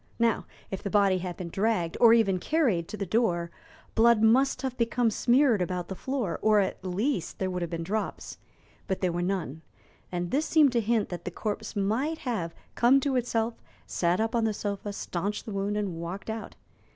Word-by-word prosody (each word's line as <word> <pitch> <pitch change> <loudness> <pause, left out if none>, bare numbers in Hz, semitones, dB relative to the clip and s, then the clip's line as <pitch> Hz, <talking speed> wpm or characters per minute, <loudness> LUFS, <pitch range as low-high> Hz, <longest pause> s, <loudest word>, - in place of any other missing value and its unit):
Now, 230 -2 +1 0.2
if 195 - -4
the 200 - -3
body 195 -2 +3
had 180 -1 -5
been 175 -2 -5
dragged, 195 -3 0
or 235 -2 +8
even 210 -5 +4
carried, 225 - +1
to 215 - -7
the 200 - -2
door, 175 -4 0 0.4
blood 230 -1 +5
must 260 +6 +3
have 260 -2 -2
become 235 -1 +1
smeared 245 -1 +3
about 180 0 -2
the 190 - -4
floor, 255 -5 -2
or 215 -1 +4
at 190 -2 -1
least 190 - -1
there 190 -1 -1
would 180 0 -3
have 170 - -2
been 165 -1 -3
drops, 210 +5 -4 0.5
but 190 - -2
there 185 -2 +1
were 175 +1 -2
none, 175 -5 -2 0.5
and 175 -1 -3
this 295 +4 +1
seemed 305 -4 +5
to 235 -1 +2
hint 225 0 +1
that 175 -1 -6
the - - -3
corpse 215 +4 -4
might 225 +11 0
have 210 - -3 0.2
come 250 +3 +5
to 275 -1 0
itself, 230 -2 -1 0.2
sat 175 +2 0
up 225 +1 0
on 235 -1 +2
the 215 -2 0
sofa, 205 0 -3
stanched 200 +1 -3
the 220 - -6
wound, 200 +1 -1
and 200 -5 -2
walked 185 +6 -5
out. 220 0 -6
210 Hz, 200 wpm, -28 LUFS, 180-235 Hz, 0.5 s, or